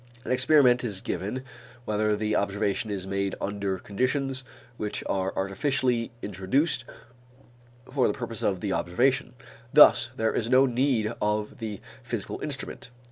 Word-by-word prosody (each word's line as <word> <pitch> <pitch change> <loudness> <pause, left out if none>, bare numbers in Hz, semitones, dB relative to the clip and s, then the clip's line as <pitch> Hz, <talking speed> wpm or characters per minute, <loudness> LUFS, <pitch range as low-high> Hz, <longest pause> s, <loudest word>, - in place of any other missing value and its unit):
An - - -3
experiment 130 -1 +5
is 105 -6 -2
given 105 +7 -4 0.4
whenever 105 0 +1
the 105 0 -1
observation 100 +1 0
is 95 -2 -3
made 100 0 -2
under 100 -1 -2
conditions 130 +7 -1 0.3
which 105 -2 -4
are 95 0 0
artificially 120 +4 0
introduced 120 - 0 1.0
for 135 -2 +1
the - - 0
purpose 115 -4 -5
of 95 -3 0
the 100 -2 -1
observation. 125 +11 +1 0.4
Thus 135 -4 +7
there 110 -3 0
is 115 - -1
no 130 +1 +6
need 125 -3 +1
of 105 +3 -1
the 110 -3 -5 0.2
physical - - -5
instrument. - - -5
110 Hz, 135 wpm, -27 LUFS, 100-130 Hz, 1.0 s, Thus